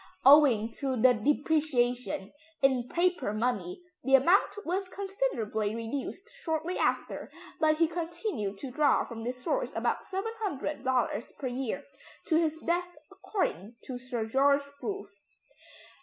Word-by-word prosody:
Owing 260 -6 +7
to 265 -3 -1
the 250 +2 +6
depreciation 250 -5 0 0.3
in 255 -3 +3
paper 350 - +1
money 215 - -2 0.2
the 270 +2 +5
amount 360 +9 +3
was 370 +2 -1
considerably 300 - -2
reduced 265 - -5
shortly 320 -1 -2
after, - - -1 0.3
but 310 -1 +3
he 330 0 +4
continued 330 - -3
to 265 +4 -6
draw 285 +1 +3
from 225 -1 -7
this 250 +1 -4
source - - 0
about - - -1
$700 300 - -2
per 275 - -6
year 260 +2 -3 0.4
to 330 - +1
his 320 -1 +2
death 350 +1 -1
according 230 - -3
to 250 -2 -6
Sir 245 -3 -3
George 280 +4 +3 0.2
Grove. 400 - -5
275 Hz, 125 wpm, -30 LUFS, 245-345 Hz, 0.4 s, Owing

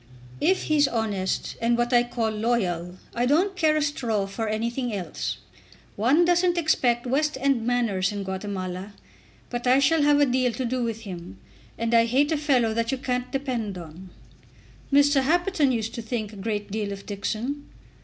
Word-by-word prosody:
"If 375 +1 +2
he's 295 -2 +3
honest, 210 -6 -2
and 235 +1 +2
what 240 +1 0
I 240 - +6
call 240 -2 -1
loyal, 190 -6 -1 0.2
I 240 +1 0
don't 360 +8 +2
care 315 -4 +3
a 305 - +1
straw 235 -8 -1
for 220 +3 -4
anything 235 +3 -2
else. 185 -6 -4 0.6
One 270 +11 +3
doesn't 350 0 +3
expect 250 -7 +2
West 290 +4 0
end 260 -4 +1
manners 215 -6 +1
in 205 -1 -4
Guatemala. 190 0 -5 0.6
But 240 0 -3
I 255 +1 +6
shall 295 +3 +3
have 290 0 +4
a 290 - +6
deal 250 -2 +1
to 255 +3 -3
do 250 +1 -1
with 225 -1 -3
him, 175 - -8 0.4
and 230 0 -1
I 230 0 +6
hate 275 +6 +2
a 315 - +2
fellow 260 -7 +2
that 230 +2 0
you 270 - -1
can't 250 -1 -2
depend 245 -8 -2
on." 175 +2 -10 0.8
"Mr. 285 0 +5
Happerton 330 0 +2
used 225 -2 -2
to 235 - -5
think 220 -2 -4
a - - -10
great 205 0 -3
deal 210 -1 -2
of 200 0 -7
Dixon." 230 +8 -4
240 Hz, 180 wpm, -25 LUFS, 210-275 Hz, 0.8 s, I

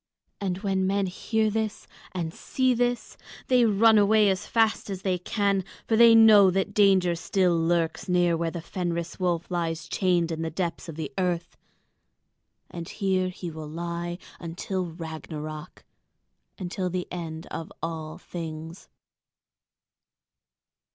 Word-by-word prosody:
And 185 -3 -2
when 190 -2 +1
men 200 0 +1
hear 215 +4 0
this 220 0 -2 0.3
and 170 -3 -3
see 260 -1 0
this 245 0 -1 0.3
they 250 -2 +5
run 220 +1 +5
away 210 0 +5
as 190 - -3
fast 225 -2 +1
as 190 -1 -5
they 185 -2 0
can, 200 0 0 0.2
for 225 - +2
they 230 0 +8
know 215 -3 +8
that 195 +2 -1
danger 190 -4 +4
still 180 +1 +1
lurks 165 +1 0
near 175 -1 +3
where 165 0 -1
the 165 0 -6
Fenris 170 -1 -3
wolf 175 -1 -1
lies 165 -2 -2
chained 175 -2 +1
in 160 0 -3
the 165 - -1
depths 170 0 -3
of 160 - -7
the 155 -3 -5
earth; 180 -2 -1 1.2
and 170 -1 -7
here 190 -2 0
he 180 -1 -6
will 155 -1 -7
lie 170 +1 -4 0.2
until 180 +2 -3
Ragnarök, 155 -2 -7 0.7
until 185 0 -3
the 180 0 -3
end 165 -2 -5
of 165 - -6
all 160 -2 -4
things. 160 0 -8
180 Hz, 140 wpm, -26 LUFS, 165-200 Hz, 1.2 s, they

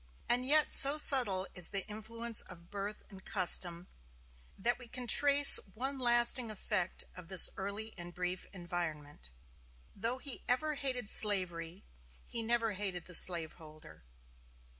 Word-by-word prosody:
And 250 +1 +2
yet 305 +1 +4
so 280 +2 +3
subtle 235 -11 +4
is 180 -2 0
the 195 -2 -2
influence 225 +2 -4
of 170 -1 -15
birth 205 +1 -8
and 190 -1 -16
custom, 180 -2 0 0.7
that 240 +5 -3
we 245 - -14
can 250 +1 -9
trace 285 +3 +8 0.2
one 265 +4 -6
lasting 240 -1 0
effect 210 -3 -4
of 180 -2 -14
this 185 -1 +2
early 200 +3 -8
and 175 0 -10
brief 180 +1 -7
environment. 170 - -9 0.7
Though 230 +5 -5
he 265 -1 -10
ever 305 +5 -1
hated 260 -5 -2
slavery, 185 -4 +1 0.4
he 230 - -5
never 230 0 -3
hated 190 -3 -5
the 180 - -12
slaveholder. 160 - 0
205 Hz, 140 wpm, -30 LUFS, 180-240 Hz, 0.7 s, trace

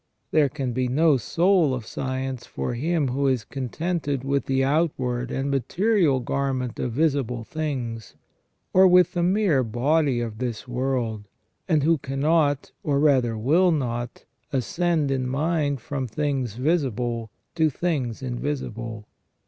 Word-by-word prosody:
There 150 -3 +4
can 135 -3 -3
be 130 +1 0
no 150 +3 +3
soul 170 - +2
of 120 -3 -6
science 130 0 -4
for - - -3
him 150 +3 0
who 135 +3 0
is 130 -4 +1
contented 145 +1 -3
with 140 0 -1
the 135 0 +2
outward 130 -5 0
and 135 +1 -2
material 155 - +2
garment 130 -1 -2
of 125 - -1
visible 135 -5 0
things, 120 -5 -4 0.6
or 190 +1 +7
with 180 0 +5
the 175 - 0
mere 180 -6 +3
body 130 +4 +1
of 115 -2 -4
this 120 -1 -4
world, 125 -4 -2 0.4
and 155 -5 +2
who 165 0 +3
cannot, 145 +2 +1
or 140 -2 +1
rather 130 -6 +3
will 160 +11 +3
not, 120 -5 -3 0.3
ascend 150 - 0
in 130 -2 0
mind 145 0 0
from 135 0 -3
things 130 -3 -2
visible 125 -5 -1 0.2
to 160 -2 +2
things 135 -7 -2
invisible. 120 -4 -4
135 Hz, 140 wpm, -24 LUFS, 125-155 Hz, 0.6 s, or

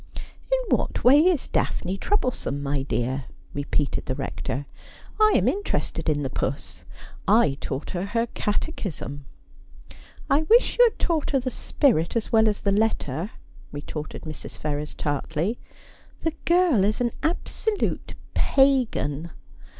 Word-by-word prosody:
' - - -28
In - - +3
what - - -3
way 270 +4 +8
is 345 -7 +2
Daphne 185 - -1
troublesome, 245 - -1
my 140 0 0
dear 130 0 -2
?' - - -26
repeated 145 0 -1
the 130 - -1
Rector. 130 +2 -4 0.3
' - - -21
I 430 0 +6
am - - +3
interested 405 - -1
in 145 -1 +1
the 135 - -2
puss. 140 - -4 0.4
I 205 -9 +5
taught 135 +1 -4
her 180 +1 -2
her 230 +3 0
Cate 220 +9 -1
chism.' 145 -7 -5 0.5
' - - -18 0.4
I 275 - +4
wish 460 +9 +4
you - - +10
had - - -20
taught 325 -4 0
her 275 - +2
the 255 0 -3
spirit 235 - +1
as 230 -1 -1
well 220 -1 +5
as 205 - -2
the 200 - +1
letter, 195 -6 0 0.2
' - - -23
retorted 145 +1 -6
Mrs. 155 -2 -8
Ferrers 150 0 -3
tartly. 160 - -2 0.3
' - - -27
The 325 - 0
girl 340 - +4
is 210 +2 +1
an 240 -1 +1
absolute 400 +5 -1 0.2
pagan. 230 - +2
205 Hz, 160 wpm, -25 LUFS, -, 0.5 s, you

